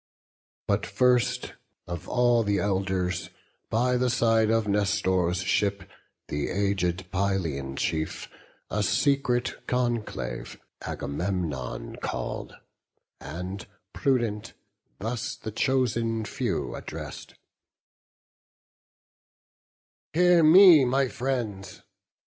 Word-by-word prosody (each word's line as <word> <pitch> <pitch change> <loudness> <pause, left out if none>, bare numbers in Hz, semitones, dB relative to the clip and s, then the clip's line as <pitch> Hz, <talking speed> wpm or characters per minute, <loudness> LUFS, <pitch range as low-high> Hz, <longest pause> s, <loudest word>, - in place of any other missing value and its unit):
But - - +1
first, 125 0 +2 0.3
of 85 0 -6
all 120 -1 +3
the 100 -2 +1
Elders, 95 -2 -1 0.4
by 125 +2 +2
the 125 0 +1
side 115 -2 +3
Of 115 -1 +2
Nestor's 95 -3 +1
ship, 100 0 0 0.4
the 75 0 -2
aged 95 -2 -1
Pylian 85 -9 -1
chief, 80 -1 -2 0.4
A 105 - 0
secret 125 +2 +1
conclave 115 - -2 0.2
Agamemnon 75 -3 -4
call'd; - - -4 0.6
And, 90 +7 -6 0.3
prudent, 115 -5 0 0.4
thus 115 +1 -3
the 110 - -7
chosen 115 -3 0
few - - -2
address'd: - - -8 2.8
"Hear 175 +1 +5
me, 165 -1 +8
my 130 +1 +2
friends! 120 -8 -4
105 Hz, 85 wpm, -27 LUFS, 95-125 Hz, 2.8 s, me